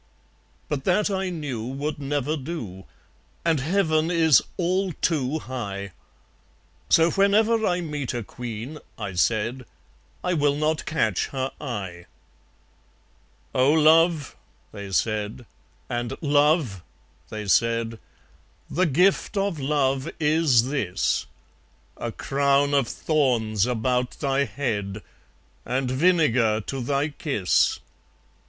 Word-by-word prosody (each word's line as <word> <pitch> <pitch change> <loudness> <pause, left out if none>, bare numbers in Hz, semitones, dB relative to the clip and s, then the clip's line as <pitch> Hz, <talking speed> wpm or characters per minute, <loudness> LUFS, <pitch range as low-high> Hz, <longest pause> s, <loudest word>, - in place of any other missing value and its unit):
But 140 -2 -3
that, 205 +3 +2
I 190 -1 -1
knew, 145 -10 -4
would 140 +5 -4
never 145 +1 -1
do; 130 - -6 0.6
And 165 -3 +3
Heaven 160 +1 +1
is 160 -5 +5 0.2
all 185 +1 0
too 150 -4 0
high. 100 -8 -5 1.0
So 165 +1 +5
whenever 215 +3 +3
I 180 0 +1
meet 150 -7 -4
a 120 - -3
Queen, 120 +6 -7 0.2
I 100 -4 -5
said, 115 +7 0 0.6
I 180 - 0
will 145 -3 +2
not 155 +1 -1
catch 110 - 0
her 135 -1 -3
eye. 95 - -5 1.5
"Oh! 130 +3 +4
Love," 160 -1 +4 0.4
they 100 -2 -8
said, 110 +4 -1 0.4
and 120 -1 -3
"Love," 145 - +2 0.5
they 110 -1 -5
said, 115 +1 +1 0.7
"The 185 +3 +2
gift 185 +7 +2
of 195 -5 0
Love 135 0 0
is 150 -5 +3
this; 105 -12 0 0.7
A - - -4
crown 140 +1 +1
of 140 -4 +3
thorns 120 -10 +1
about 125 +1 -1
thy 140 -1 +1
head, 105 -4 -3 0.6
And 130 0 -1
vinegar 130 -8 +3
to 135 +5 -5
thy 140 +4 0
kiss!" 135 - +1
140 Hz, 110 wpm, -24 LUFS, 115-160 Hz, 1.5 s, is